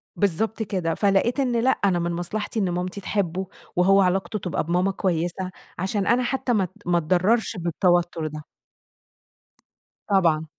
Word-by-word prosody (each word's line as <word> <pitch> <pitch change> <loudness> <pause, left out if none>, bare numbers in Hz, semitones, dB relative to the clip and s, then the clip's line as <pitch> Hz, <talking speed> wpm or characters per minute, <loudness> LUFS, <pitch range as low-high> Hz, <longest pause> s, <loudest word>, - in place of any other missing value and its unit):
بالضبط 215 +4 0
كده، 185 -5 -1
فلقيت 205 +6 +2
إن 250 -3 +1
لأ 255 - +2
أنا 195 -8 +2
من 170 0 -1
مصلحتي 205 +6 -3
إن 190 - +1
مامتي 180 +3 -3
تحبه، 190 -2 -2 0.3
وهو 195 +2 +5
علاقته 195 +3 0
تبقى 180 -3 -2
بماما 180 +4 +1
كويسة، 185 0 -2 0.3
عشان 195 +2 -1
أنا 245 +1 +3
حتّى 255 -1 -1
ما 200 -3 +2
ات 180 - -4 0.2
ما 175 0 +2
اتضرّرش 185 +7 +1
بالتوتّر 175 -1 +1
ده. 155 0 -8 1.6
طبعًا. 165 -5 +3
185 Hz, 145 wpm, -24 LUFS, 175-205 Hz, 1.6 s, وهو